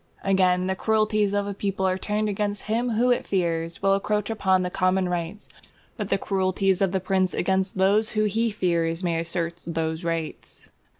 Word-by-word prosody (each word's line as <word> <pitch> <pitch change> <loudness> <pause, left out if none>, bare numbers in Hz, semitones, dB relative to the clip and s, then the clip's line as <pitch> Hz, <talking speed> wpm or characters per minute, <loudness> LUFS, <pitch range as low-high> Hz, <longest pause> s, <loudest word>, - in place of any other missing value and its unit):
Again, 185 -2 +2
the 190 - 0
cruelties 215 0 +1
of 205 0 0
a 200 - -3
people 195 -1 -1
are 185 - +1
turned 210 +3 -1
against 205 0 -2
him 230 +3 -1
who 245 +3 +3
it 245 - +1
fears 165 -2 -1
will 195 0 +4
encroach 210 +2 0
upon 190 -4 +2
the 180 - -3
common 185 0 +1
rights, 175 +3 -4 0.5
but 210 -3 -4
the - - +2
cruelties 190 -1 0
of 195 -2 +2
the 190 - 0
prince 185 0 0
against 190 +1 0
those 200 +3 +3
who 215 - +3
he 225 +3 +1
fears 170 -4 -1
may 170 -2 0
assert 170 0 -3
those 160 0 -3
rights. 165 -2 -5
190 Hz, 185 wpm, -25 LUFS, 180-205 Hz, 0.5 s, will